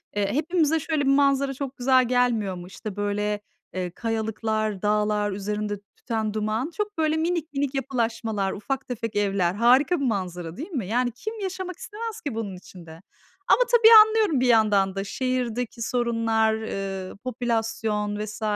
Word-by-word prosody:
eee, 200 +1 0
hepimize 320 +1 +1
şöyle 310 0 -1
bir 275 - +4
manzara 275 -1 +2
çok 275 0 -6
güzel 255 0 +4
gelmiyor 240 -6 +1
mu? 175 0 -9
İşte, 200 +1 -8
böyle, 205 0 -1 0.3
eee, 180 -1 -3
kayalıklar, 220 -1 -2
dağlar, 210 0 +1
üzerinde 205 +1 -3 0.2
tüten 220 -3 -3
duman. 215 +7 -1
Çok, 420 -3 -3
böyle, 315 0 +1
minik, 325 -2 -1
minik 275 0 -1
yapılaşmalar, 225 -6 -1
ufak 265 +6 -4
tefek 230 -3 -4
evler. 195 -4 +1
Harika 255 - +4
bir 280 - -1
manzara 180 -7 -3
değil 320 +9 -7
mi? 245 - -3
Yani, 245 +3 +1
kim 435 - -7
yaşamak 375 -2 -4
istemez 450 +1 -6
ki 280 -7 -4
bunun 205 -4 -4
içinde? 170 -2 -13 0.5
Ama - - +5
tabii 465 -2 +7 0.2
anlıyorum 435 - +1
bir 255 - +2
yandan 210 -4 +3
da. 195 - -2
Şehirdeki 245 0 -2
sorunlar, 230 -2 +1
eee, 195 -3 -4
popülasyon 225 -4 -2
vs. 215 +1 -6
225 Hz, 155 wpm, -25 LUFS, 205-275 Hz, 0.5 s, tabii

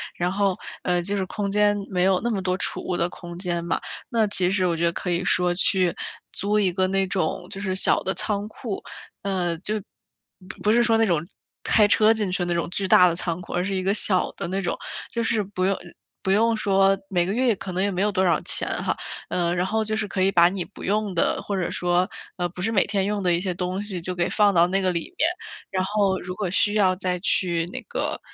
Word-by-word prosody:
然 175 0 0
后， 195 -1 +1 0.3
呃， 180 -1 +1
就 200 +4 -1
是 195 -2 -1
空 200 +1 -3
间 205 0 +3
没 180 -2 0
有 190 -1 +3
那 240 - -1
么 205 -4 -1
多 185 0 0
储 - - 0
物 180 - -1
的 170 - +1
空 175 -1 -10
间 175 -2 -2
嘛。 170 - -1 0.3
那 225 -3 +2
其 185 -3 +3
实 190 -1 +2
我 170 - 0
觉 165 - -2
得 170 - +3
可 180 - -4
以 175 +1 0
说 180 -1 +2
去 185 -1 +2 0.4
租 205 +2 +1
一 195 -3 +2
个 185 0 +1
那 195 0 +1
种 180 -1 -2
就 195 - -7
是 190 -2 -1
小 190 - +3
的 190 - -1
仓 205 -1 -1
库。 215 -3 -6 0.4
呃， 180 -4 -1
就 210 +4 -1 0.9
不 210 - +3
是 240 - +4
说 230 -1 +3
那 225 - +4
种 165 -5 0 0.4
开 210 -2 +4
车 215 +2 +5
进 215 -3 -1
去 180 0 0
那 175 - -1
种 170 0 -1
巨 195 +2 -2
大 180 - +7
的 170 - 0
仓 170 -1 -1
库， - - -9
而 175 - 0
是 195 +1 -2
一 185 - -1
个 195 +2 +2
小 195 -3 +3
的 - - -5
那 195 +1 -1
种。 175 - -2 0.3
就 235 - -1
是 225 -2 +1
不 185 -1 -3
用 195 0 +1 0.5
不 190 - +1
用 225 +3 +3
说 195 -2 +3
每 175 -2 +1
个 190 - -2
月 245 0 +2
可 185 - -6
能 185 - 0
也 200 - 0
没 185 0 -2
有 210 - +2
多 190 -1 +1
少 175 - +3
钱 - - +2 0.2
哈， - - 0 0.3
呃， 175 -1 0
然 180 0 0
后 220 +3 0
就 215 0 -2
是 215 -1 -1
可 195 - -2
以 190 +1 +3
把 170 -2 +6
你 185 -1 -3
不 180 +4 -12
用 205 0 0
的， 165 - +1
或 200 - -3
者 180 - -1
说， 180 +2 +1 0.3
呃， 175 0 0
不 180 +1 -9
是 225 - 0
每 205 - +3
天 200 -1 0
用 205 0 -1
的 180 -2 +2
一 170 - +1
些 185 -1 -2
东 180 +2 -3
西 200 -4 -3
就 180 +2 -4
给 175 0 0
放 205 -2 +3
到 170 -1 +5
那 195 +2 +1
个 185 - +2
里 170 - -4
面， 315 - +4 0.4
然 185 -1 -1
后 200 -1 +1
如 180 +1 -6
果 200 -4 -2
需 205 +2 +2
要 190 -3 +3
再 180 -1 -2
去 175 -3 +1
那 - - -5
个 - - -2
190 Hz, 270 characters per minute, -24 LUFS, 180-205 Hz, 0.9 s, 大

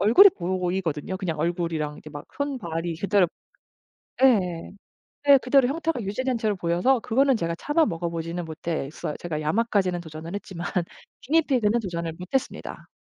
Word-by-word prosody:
얼굴이 240 - +8
보이거든요. 180 -2 -2
그냥 175 -5 -3
얼굴이랑 165 -2 -1
이렇게 155 - -12
막 145 -1 -9
손발이 175 - -3
그대로 200 -1 +3 1.0
예. 180 -10 +3 0.6
네 280 -1 +8
그대로 260 0 +4
형태가 320 -2 -1
유지된 250 +6 -1
채로 215 -2 0
보여서 180 +10 +2
그거는 265 +3 +3
제가 170 -4 -2
차마 300 +1 +2
먹어 170 0 -2
보지는 165 +1 -4
못했어요. 155 -2 -4
제가 160 -3 -4
야마까지는 185 +1 +1
도전을 160 +2 -8
했지만 180 -4 -5 0.6
기니피그는 250 -7 +2
도전을 170 -5 -4
못했습니다. 185 +9 -3
180 Hz, 380 characters per minute, -25 LUFS, 165-245 Hz, 1.0 s, 얼굴이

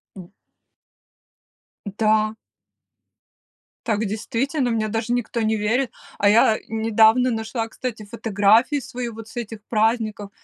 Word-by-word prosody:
М. 180 -3 -11 1.6
Да. 215 0 +2 1.5
Так 220 -1 0
действительно 245 +6 -1
мне 220 -1 -1
даже 225 +2 -2
никто 245 -1 -2
не 220 -1 +1
верит. 225 +5 0 0.3
А 205 - +3
я 215 +1 +5
недавно 225 +3 +3
нашла, 225 0 -3
кстати, 230 -2 -6
фотографии 220 +5 +2
свои 245 0 -5
вот 225 -1 -10
с 240 - -13
этих 225 -2 -5
праздников, 215 -2 0
225 Hz, 115 wpm, -22 LUFS, 215-235 Hz, 1.6 s, я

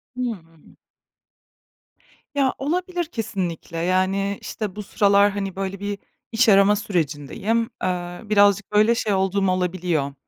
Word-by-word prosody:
Hıı. 180 -11 -6 1.6
Ya 270 -2 +2
olabilir 350 +4 -2
kesinlikle, 190 - -4
yani, 185 +3 0
işte, 210 -4 -5
bu 210 - -5
sıralar, 200 0 +3
hani, 195 -2 -4
böyle, 195 0 -4
bir 205 0 -3 0.3
iş 225 +1 +3
arama 200 +1 +6
sürecindeyim. 195 +4 -1
Iıı, 180 +2 -3
birazcık 200 -1 +4
böyle 215 +3 +4
şey 215 -3 0
olduğum 190 0 +1
olabiliyor, 175 -6 -1
200 Hz, 115 wpm, -23 LUFS, 180-215 Hz, 1.6 s, arama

